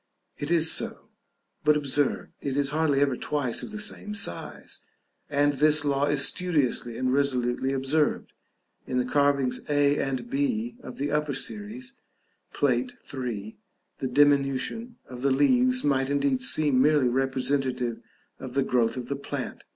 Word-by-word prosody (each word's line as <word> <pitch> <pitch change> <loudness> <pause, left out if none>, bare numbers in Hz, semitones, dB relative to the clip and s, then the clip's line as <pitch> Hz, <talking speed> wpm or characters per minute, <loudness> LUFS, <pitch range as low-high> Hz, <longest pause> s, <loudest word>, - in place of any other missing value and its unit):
It 145 - -4
is 165 -1 +4
so, - - -2 0.5
but 150 0 +4
observe, 145 -1 0
it 140 -1 -3
is 140 -1 0
hardly 150 -2 +1
ever 140 -3 +2
twice 135 -3 -2
of - - -7
the 215 0 -6
same 210 0 -2
size; 85 - -3 0.5
and 145 0 +2
this 150 +1 +3
law 140 0 +1
is 145 -1 +4
studiously 140 -9 0
and 130 0 0
resolutely 130 -2 0
observed. 135 +3 0 0.5
In 125 - -2
the 125 - +1
carvings 140 -2 +1
a 145 0 +3
and 135 - -2
b 245 -4 -1
of - - -10
the 145 +1 -2
upper 150 -2 0
series, 220 - -3 0.5
Plate 245 -1 0 0.2
III., 115 -6 -5 0.4
the 130 - -2
diminution 145 - +1
of 125 -1 -9
the 140 - +2
leaves 250 - +3
might 135 -2 +1
indeed 140 -2 +1
seem 140 0 +2
merely 145 -2 +4
representative 130 -1 -1 0.4
of 130 -1 -8
the 135 - +3
growth 120 -2 +1
of 125 - -4
the 140 - -2
plant. 140 - -6
140 Hz, 150 wpm, -26 LUFS, 130-150 Hz, 0.5 s, is